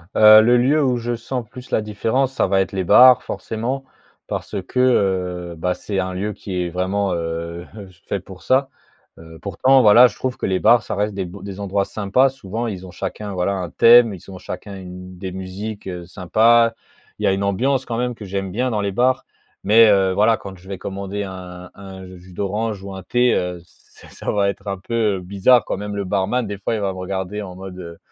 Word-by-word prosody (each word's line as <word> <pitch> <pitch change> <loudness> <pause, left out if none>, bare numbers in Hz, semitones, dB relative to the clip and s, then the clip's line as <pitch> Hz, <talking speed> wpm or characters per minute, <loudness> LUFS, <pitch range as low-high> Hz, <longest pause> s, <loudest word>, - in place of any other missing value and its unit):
Heu, 110 0 +9
le 120 +3 +4
lieu 140 +5 +3
où 125 -2 +1
je 120 0 -3
sens 120 0 -5
plus 125 +1 -12
la - - +2
différence 115 +5 -1
ça - - +1
va 95 - +2
être 95 0 -3
les 95 -1 -1
bars 125 +7 +7
forcément. 125 +5 -4 0.4
Parce - - -5
que, 125 - -3
heu, 90 -8 +1
bah, 90 +3 -1
c'est 100 +1 -4
un 95 0 -2
lieu 100 +3 -3
qui 95 -3 -5
est 90 - -3
vraiment, 95 +3 -1
heu, 85 +1 -4
heu, 100 -3 -10 0.2
fait 100 - -2
pour 95 0 -13
ça, 135 +1 +2 0.5
heu, 80 0 -13
pourtant 130 +8 +3
voilà, 115 +3 +8
je 105 - -9
trouve 130 -1 -3
que - - -3
les 95 -1 0
bars 120 -2 +5
ça - - -4
reste 105 +1 -1
des 95 -1 -3
b 90 +3 -10
des 100 -1 -7
endroits 100 0 0
sympas, 110 +7 +1
souvent 120 -3 -5
ils 95 -4 -6
ont - - -11
chacun, 105 +3 -5
voilà 90 +1 0
un 90 -2 -4
thème, 115 -2 +6
ils 95 - -12
ont 95 - -9
chacun 100 +2 -8
une 90 0 -10
des 95 0 -6
musiques, 95 +3 -7
heu, 90 -2 -6
sympas. 115 +6 +3 0.5
Il - - -5
y - - +3
a 95 - +3
une 95 +1 -2
ambiance 125 +7 0
quand 115 - -4
même 125 0 -2
que 110 - -11
j'aime 95 0 -4
bien 125 +6 -1
dans 105 -2 -1
les 100 -1 -1
bars, 130 +5 +1 0.4
mais, 115 +2 +6
heu, 95 -2 +3
voilà 110 +3 +3
quand 95 -1 -10
je 90 +2 -18
vais 100 - -5
commander 100 +2 -5
un 90 -2 -9
un 95 -1 -10
jus 90 +1 -15
d'orange 105 +2 -3
ou 100 0 -7
un 95 - -8
thé, 125 +5 +2
heu, 90 -1 -3
c'est - - -20
ça - - -4
va 100 -1 +1
être 100 - -7
un 100 -1 -2
peu, 105 +1 -1
heu, - - -6
bizarre 100 +6 +3
quand - - -3
même 105 +1 -5
le 100 - -2
barman 105 +6 0
des 100 - -5
fois 100 +3 -2
il 110 - -3
va 100 -1 -1
me - - -10
regarder 95 +2 -4
en 95 -3 -8
mode, 95 0 -9
heu, 85 -2 -9
100 Hz, 235 wpm, -20 LUFS, 95-115 Hz, 0.5 s, Heu